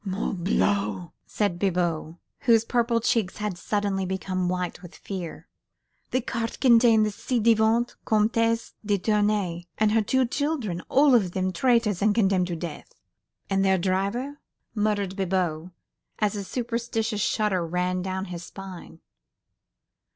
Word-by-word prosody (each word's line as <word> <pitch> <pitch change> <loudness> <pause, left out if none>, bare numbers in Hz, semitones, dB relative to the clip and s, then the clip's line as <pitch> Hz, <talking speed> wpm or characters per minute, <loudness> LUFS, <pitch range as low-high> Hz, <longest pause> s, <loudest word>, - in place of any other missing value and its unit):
"Morbleu!" 190 -2 -1 0.2
said 200 -5 -1
Bibot, 175 -4 -1 0.3
whose 230 -1 +5
purple 235 -1 +1
cheeks 220 -5 0
had 210 -3 -3
suddenly 200 +1 -1
become 185 -1 -2
white 180 -1 -3
with 175 -1 -12
fear. 185 -4 -7 0.6
"The 255 - 0
cart 230 -1 -4
contained 230 -3 +5
the 210 - -1
ci 245 +4 -2
devant 225 +1 +3
Comtesse 230 +1 +1
de 205 -1 +1
Tournay 205 -4 0
and 215 -1 +3
her 225 +1 +3
two 260 +5 +2
children, 250 - -2
all 280 0 +5
of 195 -7 +3
them 185 0 -1
traitors 230 -2 +2
and 205 0 +3
condemned 190 -5 +2
to 175 - -3
death." 165 -1 -7 0.5
"And 195 0 +1
their 190 -1 +3
driver?" 200 +10 -1 0.3
muttered 205 -3 0
Bibot, 180 -4 -1 0.5
as 210 -1 0
a 200 - -3
superstitious 230 -1 -2
shudder 205 -4 +1
ran 180 +2 -1
down 190 +1 -3
his 175 -2 -7
spine. 185 -3 -10
205 Hz, 135 wpm, -25 LUFS, 185-225 Hz, 0.6 s, whose